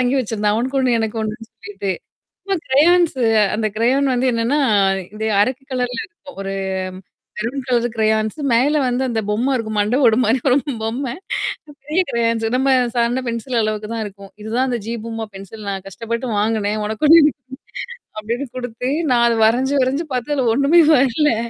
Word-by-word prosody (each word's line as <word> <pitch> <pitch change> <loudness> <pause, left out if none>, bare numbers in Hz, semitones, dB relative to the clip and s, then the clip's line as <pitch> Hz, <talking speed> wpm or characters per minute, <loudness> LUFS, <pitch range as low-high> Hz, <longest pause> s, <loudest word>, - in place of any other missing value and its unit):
வாங்கி 255 +2 +1
வச்சிருந்தான். 210 -3 -1
அவனுக்கு 260 +4 -1
1 245 -3 +2
எனக்கு 225 0 -2
1ன்னு 220 +1 -5
சொல்லிட்டு. 205 -2 -5 0.5
சும்மா 390 -1 -1
க்ரயான்ஸு 310 0 +4 0.3
அந்த 220 0 0
க்ரயான் 265 +4 +2
வந்து 250 +1 +1
என்னான்னா, 235 +6 +1 0.6
இது 220 +1 -3
அரக்கு 255 +5 0
கலர்ல 250 -1 -2
இருக்கும். 315 -5 -15
ஒரு 195 0 -4 0.8
மெரூன் 245 +5 -3
கலர் 240 -1 +2
க்ரயான்ஸு 220 +4 0
மேல 270 +6 +3
வந்து 250 +1 0
அந்தப் 220 -3 -2
பொம்மை 240 +6 +1
இருக்கும். 220 -3 -4
மண்டை 210 +5 +2
ஓடு 225 -1 +4
மாரி 230 +4 +2
ஒரு 255 - +4 0.3
பொம்மை. 240 +3 -3 0.7
பெரிய 310 +6 +1
க்ரெயான்ஸு 230 -1 0
நம்ம 265 +1 +2 0.2
சாதாரண 240 +2 +1
பென்சில் 235 +2 -3
அளவுக்குதான் 215 +1 -3
இருக்கும். 200 -1 -12
இதுதான் 235 +5 0
அந்த 245 -2 -1
ஜீ 230 - -3
பூம்பா 225 -1 -5
பென்சில் 200 +2 -10
நான் 195 -1 -5
கஷ்டப்பட்டு 230 +5 -4
வாங்குனேன். 215 0 0
உனக்கு 220 +8 -1
1 330 +2 +9
எனக்கு 295 -1 +2 0.6
1 - - -35
அப்டின்னு 235 +6 -3
குடுத்து, 250 0 -4 0.2
நான் 240 -1 +4
அத 230 - +1
வரஞ்சு, 255 +5 +1
வரஞ்சு 275 +6 -1
பாத்து 250 +3 -2
அதுல 260 -4 +1
ஒண்ணுமே 280 +7 +5
வரலை! 270 0 +3
235 Hz, 170 wpm, -19 LUFS, 220-265 Hz, 0.8 s, 1